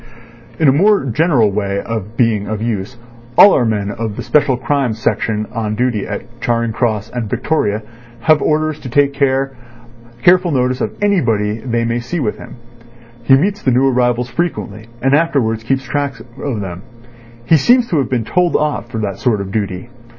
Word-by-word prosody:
"In 160 - +3
a - - +7
more 200 +2 +3
general 135 - +2
way 100 0 -2
of 110 0 -5
being 110 -4 +1
of 110 0 -3
use, 110 +1 -3 0.4
all 200 - +9
our 125 - +2
men 105 -2 -1
of 110 -2 -4
the - - -5
Special 140 -4 +2
Crimes 130 -4 -1
section 110 -1 -1
on 110 -2 -2
duty 120 -3 -1
at 120 +3 -8
Charing 115 -1 0
Cross 110 -2 -1
and 120 -4 -4
Victoria 115 -4 -1 0.4
have 155 +4 +4
orders 155 0 0
to 130 - -8
take 140 +2 +2
careful 125 +3 -1
notice 130 -1 0
of - - -3
anybody 115 - +1
they 115 -1 -1
may 115 +1 -1
see 125 +9 -4
with 115 -8 -2
him. - - -11 0.7
He 135 - +6
meets 200 +7 0
the - - +1
new 130 +2 +3
arrivals 125 -1 +1
frequently, 115 - -3 0.2
and 135 +1 +3
afterwards 135 -8 +1
keeps 135 +3 -1
track 140 +1 -2
of 120 -1 -5
them. 90 -2 -6 0.6
He 160 - +5
seems 240 - +4
to 160 - +1
have 135 - -1
been 120 -4 -1
told 180 +4 +1
off 150 -5 -1
for 115 - -5
that 100 -2 -3
sort 115 -5 +1
of 100 -1 -5
duty. 100 +1 -3
120 Hz, 180 wpm, -16 LUFS, 110-140 Hz, 0.7 s, all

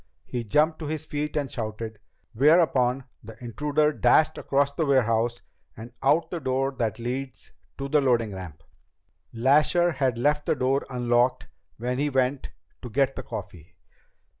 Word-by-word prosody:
He 120 -1 -4
jumped 150 +9 +2
to 155 - -5
his 155 0 -4
feet 150 0 -3
and 145 -2 0
shouted, 110 -2 -5 0.3
whereupon 135 -2 +3 0.2
the 110 0 -11
intruder 150 +6 0
dashed 155 +1 +3
across 140 +1 +1
the 160 - -2
warehouse 120 -3 +1 0.3
and 115 +2 -10
out 150 +5 +2
the 175 - -3
door 135 -1 0
that 115 -3 -1
leads 125 +3 -5 0.3
to 140 - -4
the 150 +1 +3
loading 115 -6 +1
ramp. 85 -4 -9 0.7
Lasher 150 +8 +3
had 130 -5 0
left 150 +4 +1
the - - +2
door 135 +2 0
unlocked 120 0 +1 0.3
when 125 +3 -2
he 145 +1 +1
went 130 0 0 0.3
to 125 - -7
get 135 +3 +1
the - - -4
coffee. 90 - -9
130 Hz, 155 wpm, -26 LUFS, 115-145 Hz, 0.7 s, whereupon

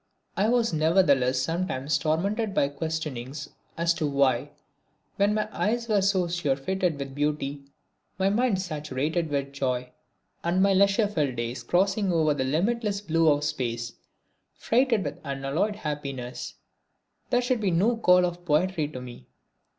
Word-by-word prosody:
I 205 +3 +2
was 235 -5 +2
nevertheless 150 -6 +3
sometimes 150 -2 -1
tormented 195 +8 -1
with 140 -4 +1
questionings 150 -4 -4 0.3
as 170 0 +2
to 160 -2 -1
why, 140 -1 +2 0.7
when 205 +1 +3
my 215 -1 0
eyes 230 +3 -1
were 210 -3 +3
so 190 -2 +2
surfeited 170 +1 -1
with 135 -1 -6
beauty, 145 -1 -2 0.5
my 190 0 +2
mind 210 0 +2
saturated 155 -1 -2
with 140 -1 -2
joy, 125 -2 -2 0.5
and 175 +2 +1
my 195 +1 +4
leisure 200 +2 +4
filled 150 -10 -1
days 120 +1 -3
crossing 190 - +1
over 160 -3 +3
the 140 -2 -1
limitless 200 - 0
blue 165 -5 +2
of 145 0 +2
space 120 -5 -2 0.6
freighted 235 -3 +2
with - - -5
unalloyed 140 +8 -1
happiness, 140 -8 -5 0.7
there 245 0 +2
should 245 -2 0
be 200 - +1
no 195 +8 +2
call 180 -5 +4
of 175 0 -4
poetry 165 0 +1
to 145 -4 -8
me. 125 -1 -11
160 Hz, 145 wpm, -26 LUFS, 140-195 Hz, 0.7 s, my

